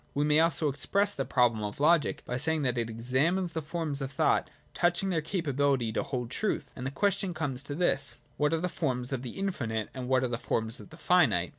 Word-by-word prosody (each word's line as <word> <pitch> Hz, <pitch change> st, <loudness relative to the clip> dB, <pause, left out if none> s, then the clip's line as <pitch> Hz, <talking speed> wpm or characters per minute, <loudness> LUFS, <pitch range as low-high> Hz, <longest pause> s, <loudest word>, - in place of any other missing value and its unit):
— -, -, -35 dB
We 145 Hz, -, +2 dB
may 150 Hz, 0 st, +4 dB
al^o 160 Hz, -1 st, +3 dB
express 200 Hz, +8 st, +1 dB
the 135 Hz, -, -2 dB
problem 120 Hz, -4 st, +2 dB
of 105 Hz, +4 st, -5 dB
logic 150 Hz, -1 st, +3 dB
by 125 Hz, -, -2 dB
saying 160 Hz, +2 st, 0 dB
that 125 Hz, -2 st, +1 dB
it 115 Hz, -1 st, -1 dB
examines 135 Hz, +11 st, 0 dB
the 160 Hz, -, -2 dB
forms 155 Hz, -2 st, -2 dB
of 135 Hz, 0 st, -3 dB
thought 130 Hz, -, +2 dB, 0.2 s
touching 175 Hz, +2 st, +1 dB
their 165 Hz, -3 st, +1 dB
capability 140 Hz, -, 0 dB
to -, -, 0 dB
hold 125 Hz, -2 st, -4 dB
truth. 215 Hz, +9 st, -1 dB
And 125 Hz, -, -4 dB
the -, -, -1 dB
question 190 Hz, +4 st, 0 dB
comes 135 Hz, -5 st, -2 dB
to 140 Hz, +1 st, -6 dB
this: 175 Hz, +3 st, +1 dB, 0.2 s
What 150 Hz, 0 st, +1 dB
are 165 Hz, -, +2 dB
the 180 Hz, -, 0 dB
forms 130 Hz, -8 st, -1 dB
of 130 Hz, -, -2 dB
the 125 Hz, -2 st, -7 dB
infinite, 120 Hz, -, -2 dB
and 130 Hz, -2 st, -5 dB
what 130 Hz, -1 st, +3 dB
are -, -, +2 dB
the 120 Hz, -1 st, -3 dB
forms 110 Hz, +2 st, -1 dB
of -, -, -12 dB
the 160 Hz, -, -13 dB
finite 135 Hz, -, +3 dB
145 Hz, 235 wpm, -29 LUFS, 125-165 Hz, 0.2 s, may